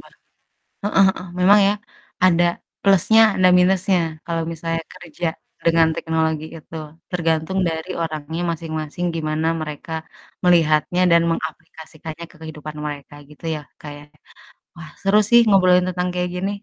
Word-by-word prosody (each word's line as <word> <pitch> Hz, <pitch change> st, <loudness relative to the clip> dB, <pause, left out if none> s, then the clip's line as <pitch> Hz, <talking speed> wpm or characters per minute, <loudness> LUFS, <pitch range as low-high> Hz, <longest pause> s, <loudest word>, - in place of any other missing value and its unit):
banget. -, -, -20 dB, 0.7 s
Heeh 205 Hz, -1 st, +3 dB
heeh, 185 Hz, -1 st, -2 dB
memang 200 Hz, +3 st, +6 dB
ya 200 Hz, -, +3 dB, 0.5 s
ada 175 Hz, -1 st, +4 dB, 0.4 s
plusnya 200 Hz, +3 st, +5 dB, 0.2 s
ada 185 Hz, -, +5 dB
minusnya 185 Hz, 0 st, +3 dB, 0.3 s
kalo 165 Hz, -1 st, -2 dB
misalnya 165 Hz, 0 st, -3 dB
kerja 175 Hz, +1 st, -7 dB, 0.4 s
dengan 165 Hz, -1 st, +4 dB
teknologi 160 Hz, -1 st, -1 dB
itu, 160 Hz, +1 st, -13 dB, 0.4 s
tergantung 165 Hz, +1 st, 0 dB
dari 160 Hz, +2 st, -5 dB
orangnya 160 Hz, +1 st, -4 dB
masing-masing, 160 Hz, +1 st, -4 dB
gimana 155 Hz, 0 st, -1 dB
mereka 155 Hz, +1 st, -7 dB, 0.5 s
melihatnya 170 Hz, 0 st, +3 dB
dan 170 Hz, 0 st, +6 dB
mengaplikasikannya 160 Hz, 0 st, -6 dB
ke -, -, -22 dB
kehidupan 155 Hz, -1 st, -8 dB
mereka 145 Hz, -1 st, -7 dB, 0.2 s
gitu 150 Hz, +2 st, -14 dB
ya, 150 Hz, -, -6 dB, 0.2 s
kayaknya. 145 Hz, 0 st, -11 dB, 0.6 s
Wah, 160 Hz, -2 st, -10 dB
seru 195 Hz, +2 st, +3 dB
sih 235 Hz, -, +8 dB
ngobrolin 185 Hz, -3 st, +5 dB
tentang 180 Hz, 0 st, -2 dB
kayak 180 Hz, 0 st, -1 dB
gini, 195 Hz, +2 st, -1 dB
165 Hz, 135 wpm, -21 LUFS, 155-180 Hz, 0.7 s, sih